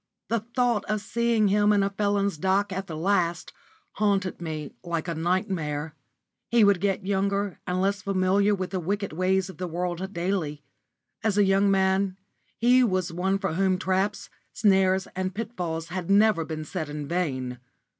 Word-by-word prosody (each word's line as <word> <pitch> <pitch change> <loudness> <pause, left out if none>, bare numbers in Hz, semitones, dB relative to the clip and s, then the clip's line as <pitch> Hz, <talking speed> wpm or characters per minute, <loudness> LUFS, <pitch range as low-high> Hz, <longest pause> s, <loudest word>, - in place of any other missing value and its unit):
The 230 - +1
thought 240 0 0
of 215 0 -1
seeing 225 0 +1
him 205 +1 +4
in 205 -1 +3
a 200 - 0
felon's 200 -3 0
dock 190 +2 +1
at 190 +1 -4
the 160 - -6
last 175 -1 0 0.4
haunted 200 -4 0
me 155 -3 -5
like 170 -1 -3
a 170 - -1
nightmare. 160 -3 -1 0.6
He 235 -2 +5
would 200 -3 +4
get 195 -1 0
younger 200 0 0
and 180 0 0
less 200 +1 0
familiar 195 +2 +2
with 185 -1 -4
the 190 - -1
wicked 195 +1 -2
ways 185 +2 +1
of 190 - -10
the 180 - -2
world 175 +2 -3
daily. 170 -5 -2 0.6
As 215 -2 +1
a 205 - +5
young 195 +1 +3
man, 190 0 +2 0.4
he 250 +2 +5
was 185 -6 0
one 190 +3 0
for 195 -4 -2
whom 190 +1 +2
traps, 190 +2 -1 0.2
snares, 190 -2 +3
and 185 0 -2
pitfalls 180 -8 -4
had 180 0 -4
never 205 -3 +4
been 155 -1 -5
set 160 -2 -4
in 145 -1 -5
vain. 130 -8 -2
190 Hz, 170 wpm, -26 LUFS, 175-200 Hz, 0.6 s, He